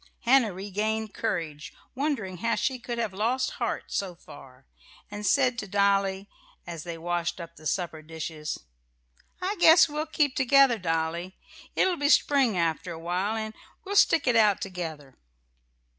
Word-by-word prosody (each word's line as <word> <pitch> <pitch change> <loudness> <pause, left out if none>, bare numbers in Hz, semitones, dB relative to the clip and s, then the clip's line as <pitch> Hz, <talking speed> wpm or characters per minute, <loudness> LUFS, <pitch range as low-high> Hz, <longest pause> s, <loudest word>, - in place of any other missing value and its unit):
Hannah 245 -3 +4
regained 210 +3 -3
courage, 160 -9 -3 0.2
wondering 255 -10 -2
how 230 +6 0
she 265 -1 -1
could 240 0 -5
have 225 -4 -2
lost 235 +6 0
heart - - -1
so 190 -3 -2
far, 130 -5 -15 0.5
and 205 0 -6
said 255 -4 +3
to 205 - -5
Dolly, 195 0 +1 0.4
as 170 -2 -6
they 170 -1 -6
washed 175 +1 -2
up 170 -1 -9
the 155 - -7
supper 165 0 -2
dishes: 155 -1 -6 0.8
"I 400 +3 -1
guess 325 -1 +7
we'll 305 +1 -3
keep 295 -4 +1
together, 265 -2 +4
Dolly. 165 +1 -2 0.4
It'll 365 -2 +2
be 285 0 +1
spring 270 -9 +4
after 170 +1 -1
a 165 - -6
while, 180 +6 -2
and 220 -1 -4 0.3
we'll 400 +1 -4
stick 330 -4 +5
it 245 - +3
out 210 -3 +4
together." 160 -8 -7
200 Hz, 155 wpm, -27 LUFS, 170-250 Hz, 0.8 s, guess